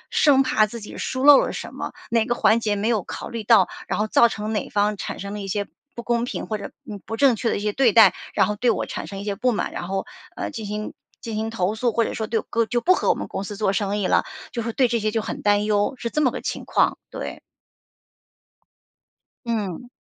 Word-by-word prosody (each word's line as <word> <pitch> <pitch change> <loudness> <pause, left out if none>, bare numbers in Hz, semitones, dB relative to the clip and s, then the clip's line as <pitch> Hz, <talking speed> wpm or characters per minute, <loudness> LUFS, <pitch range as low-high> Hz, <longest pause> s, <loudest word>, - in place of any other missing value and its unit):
生 275 -3 +5
怕 215 -4 +3
自 230 +2 -8
己 210 - -9
疏 260 +1 -2
漏 290 -1 +10
了 - - 0
什 - - -7
么， - - -5 0.2
哪 230 -1 +2
个 240 -1 0
环 225 +1 +4
节 210 -2 0
没 205 +2 -1
有 220 -5 +1
考 - - -7
虑 230 -2 -5
到， 210 -4 +5 0.2
然 - - -1
后 210 - +1
造 235 +2 +5
成 215 0 -4
哪 210 - -2
方 205 0 +1
产 - - -5
生 200 0 -6
了 210 - -5
一 195 - -6
些 200 +1 -1 0.3
不 235 - -5
公 235 -1 +1
平， - - -4
或 215 -1 -3
者， 200 - -7 0.2
嗯， 205 -2 -6
不 225 - -5
正 270 -1 +5
确 225 +1 -1
的 - - 0
一 - - -3
些 210 0 -1
对 245 -2 +3
待。 210 -5 +7 0.2
然 195 -2 +4
后 210 - -1
对 245 +3 +2
我 220 - -1
产 - - -6
生 195 - -7
一 200 - -6
些 200 -1 -2
不 250 +5 +1
满， 225 - -2
然 175 - -5
后， 195 0 -2 0.3
呃， - - -3
进 220 -3 -6
行 210 +1 -4 0.3
进 225 -2 -5
行 220 +1 -2
投 210 -2 -1
诉。 235 +1 0
或 230 - +2
者 - - -4
说 220 - -3
对， 225 0 0 0.3
就 240 -1 +1
不 370 +7 +4
和 - - -1
我 - - +5
们 - - -6
公 195 - -4
司 205 0 -6
做 205 -3 +1
生 205 0 0
意 195 - 0
了 - - +3 0.3
就 235 - -2
是 230 - -3
对 255 +1 +3
这 235 0 +1
些 215 0 0
就 225 - 0
很 - - -5
担 205 0 +3
忧， 205 +4 +1
是 235 - -3
这 305 - 0
么 255 - +4
个 - - -5
情 - - -4
况， - - +2
对。 - - -6 2.1
嗯。 220 -1 -3
215 Hz, 280 characters per minute, -23 LUFS, 205-235 Hz, 2.1 s, 漏